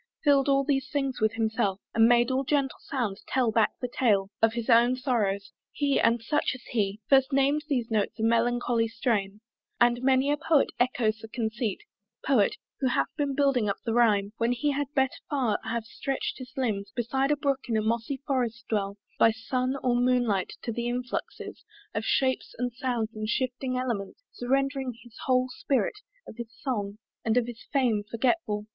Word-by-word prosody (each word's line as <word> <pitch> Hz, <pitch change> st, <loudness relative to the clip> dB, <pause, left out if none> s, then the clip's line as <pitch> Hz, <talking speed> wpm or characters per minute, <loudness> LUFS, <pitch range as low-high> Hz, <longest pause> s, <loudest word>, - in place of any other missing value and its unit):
fill'd 280 Hz, -2 st, +4 dB
all 275 Hz, 0 st, +3 dB, 0.3 s
things 275 Hz, -3 st, -1 dB
with 215 Hz, 0 st, +3 dB
himself 220 Hz, -3 st, 0 dB
And 225 Hz, 0 st, +5 dB
made 240 Hz, +1 st, +4 dB
all 260 Hz, +1 st, +1 dB
gentle 275 Hz, -1 st, 0 dB
sounds 225 Hz, -7 st, -3 dB
tell 255 Hz, -4 st, +1 dB
back 220 Hz, 0 st, +2 dB
the 250 Hz, -, -1 dB
tale 205 Hz, -6 st, +1 dB
Of 225 Hz, 0 st, +4 dB
his 235 Hz, -1 st, -4 dB
own 240 Hz, +1 st, +5 dB
sorrows) 210 Hz, -6 st, -1 dB, 0.2 s
he 285 Hz, -1 st, +1 dB
and 230 Hz, 0 st, +2 dB
such 295 Hz, +5 st, 0 dB
as 255 Hz, -, -12 dB
he 205 Hz, -3 st, 0 dB
First 270 Hz, 0 st, +4 dB
nam'd 280 Hz, +2 st, +2 dB
these 245 Hz, -5 st, -1 dB
notes 215 Hz, -1 st, 0 dB
a 220 Hz, -, -3 dB
melancholy 235 Hz, 0 st, +2 dB
strain; 215 Hz, -3 st, -1 dB, 0.4 s
And 240 Hz, 0 st, +4 dB
many 265 Hz, +2 st, +3 dB
a 295 Hz, -, +1 dB
poet 310 Hz, -1 st, +2 dB
echoes 240 Hz, -3 st, +1 dB
the 225 Hz, -, -9 dB
conceit, 220 Hz, -1 st, -3 dB, 0.4 s
Poet, 255 Hz, -, +3 dB, 0.2 s
who 265 Hz, -, +1 dB
hath 140 Hz, -, +1 dB
been 285 Hz, -2 st, -1 dB
building 270 Hz, -6 st, +2 dB
up 200 Hz, -, -1 dB
the 230 Hz, -, 0 dB
rhyme 210 Hz, -4 st, +3 dB
When 235 Hz, +1 st, +1 dB
he 290 Hz, +4 st, 0 dB
had 285 Hz, 0 st, -2 dB
better 265 Hz, -1 st, +1 dB
far 255 Hz, -8 st, +1 dB
have 230 Hz, -1 st, -2 dB
stretch'd 270 Hz, +4 st, -3 dB
his 255 Hz, -1 st, -8 dB
limbs 210 Hz, -6 st, -1 dB
Beside 265 Hz, +3 st, 0 dB
a 295 Hz, -, +2 dB
brook 275 Hz, -2 st, -1 dB
in 230 Hz, -, 0 dB
mossy 230 Hz, +4 st, -1 dB
forest 240 Hz, -4 st, -1 dB
dell 200 Hz, -2 st, -1 dB, 0.2 s
By -, -, +7 dB
sun 255 Hz, +4 st, -1 dB
or 245 Hz, -1 st, +2 dB
moonlight, 245 Hz, -6 st, +1 dB
to 235 Hz, -, -2 dB
the 235 Hz, +1 st, -3 dB
influxes 245 Hz, 0 st, -5 dB, 0.3 s
Of 220 Hz, -, -2 dB
shapes 260 Hz, -1 st, 0 dB
and 245 Hz, 0 st, -2 dB
sounds 240 Hz, -3 st, -2 dB
and 215 Hz, 0 st, -4 dB
shifting 255 Hz, +1 st, -1 dB
elements 240 Hz, -, -3 dB
Surrendering 270 Hz, 0 st, -1 dB
his 240 Hz, -2 st, -17 dB
whole 255 Hz, 0 st, +3 dB
spirit, 420 Hz, -, -1 dB, 0.3 s
of -, -, -11 dB
his 235 Hz, -2 st, -6 dB
song 205 Hz, -6 st, -3 dB, 0.3 s
And 225 Hz, +1 st, +1 dB
of 245 Hz, -, +3 dB
his 240 Hz, -1 st, -8 dB
fame 245 Hz, -7 st, +2 dB
forgetful! 230 Hz, -3 st, 0 dB
240 Hz, 180 wpm, -27 LUFS, 225-265 Hz, 0.4 s, By